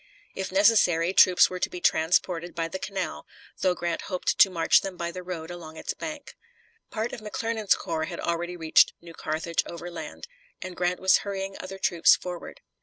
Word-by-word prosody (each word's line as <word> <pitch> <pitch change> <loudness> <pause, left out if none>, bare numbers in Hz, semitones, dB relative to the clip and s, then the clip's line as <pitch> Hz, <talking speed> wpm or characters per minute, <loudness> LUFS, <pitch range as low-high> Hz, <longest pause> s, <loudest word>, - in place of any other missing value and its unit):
If 190 - -4
necessary, 190 -4 +4
troops 180 -1 +6
were 185 - -6
to - - 0
be 180 - -7
transported 170 +1 +1
by 165 -1 -1
the 190 +3 -6
canal, 195 0 -4 0.3
though 185 -1 +2
Grant 170 -1 -2
hoped 185 -2 -1
to 195 - +8
march 165 -3 +3
them 190 -2 -6
by 170 0 -3
the 185 - -7
road 175 -2 -6
along 160 -2 -9
its - - -4
bank. 305 -2 -8 0.5
Part 225 +2 -3
of - - -5
McClernand's 220 0 0
corps 160 -3 -3
had 170 0 -7
already 175 +1 -2
reached 160 -2 +4
New 170 -1 -13
Carthage 160 +1 -2
overland, 170 - -8 0.3
and 185 -1 -7
Grant 180 0 -1
was 190 0 +4
hurrying 195 -1 -5
other 195 +1 -7
troops 175 -3 +4
forward. 180 -1 -8
180 Hz, 180 wpm, -26 LUFS, 170-190 Hz, 0.5 s, to